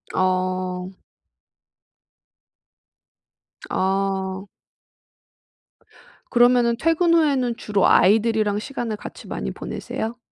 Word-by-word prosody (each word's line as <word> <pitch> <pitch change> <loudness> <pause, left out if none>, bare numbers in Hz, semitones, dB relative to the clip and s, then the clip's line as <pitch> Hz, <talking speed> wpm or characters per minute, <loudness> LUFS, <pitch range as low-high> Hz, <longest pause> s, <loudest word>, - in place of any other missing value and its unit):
어. 185 0 -1 2.8
아. 190 0 -1 1.8
그러면은 240 -1 +4
퇴근 330 +2 +2
후에는 275 -7 +2
주로 205 -2 +1
아이들이랑 215 +1 +3
시간을 235 -2 -4
같이 - - -10
많이 - - -4
보내세요? 230 +2 -5
215 Hz, 170 characters per minute, -22 LUFS, 190-245 Hz, 2.8 s, 그러면은